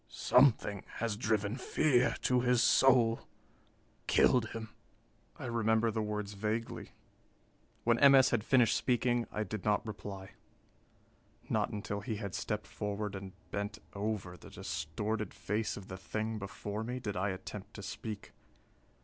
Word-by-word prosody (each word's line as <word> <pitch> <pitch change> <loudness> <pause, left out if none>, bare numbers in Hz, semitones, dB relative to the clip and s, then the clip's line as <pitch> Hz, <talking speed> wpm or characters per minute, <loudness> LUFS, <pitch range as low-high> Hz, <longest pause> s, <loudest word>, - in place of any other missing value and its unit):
Something 125 -6 +3
has 115 -2 -1
driven 110 -1 0
fear 130 -1 +2
to 125 -1 +3
his 125 -1 +3
soul, 120 -2 +4 0.8
killed 120 -3 +4
him." 110 -1 -6 0.7
I - - -7
remember 110 -1 +2
the 110 0 -1
words 105 -1 -3
vaguely. 110 +3 -3 0.9
When 115 0 +3
M. 140 -1 +8
S. 130 -1 +6
had 115 -3 +1
finished 125 -1 +4
speaking, 120 -1 +1
I 105 - -1
did 105 0 -5
not 105 0 +1
reply. 100 -3 -7 1.2
Not - - +2
until 105 -1 -4
he 110 +1 -3
had 100 -3 -5
stepped 105 -1 -2
forward 105 0 -3
and 95 -1 -7 0.2
bent 100 +2 -3 0.2
over 100 -3 -3
the 85 - -13
distorted 105 +9 -3
face 105 +1 -2
of 100 -2 -9
the 95 - -7
thing 110 +3 -3
before 105 +2 -5
me, 125 +3 -3
did 105 -5 -4
I 95 +3 0
attempt 95 +2 -7
to 105 - -7
speak. 105 0 -6
110 Hz, 145 wpm, -33 LUFS, 100-115 Hz, 1.2 s, M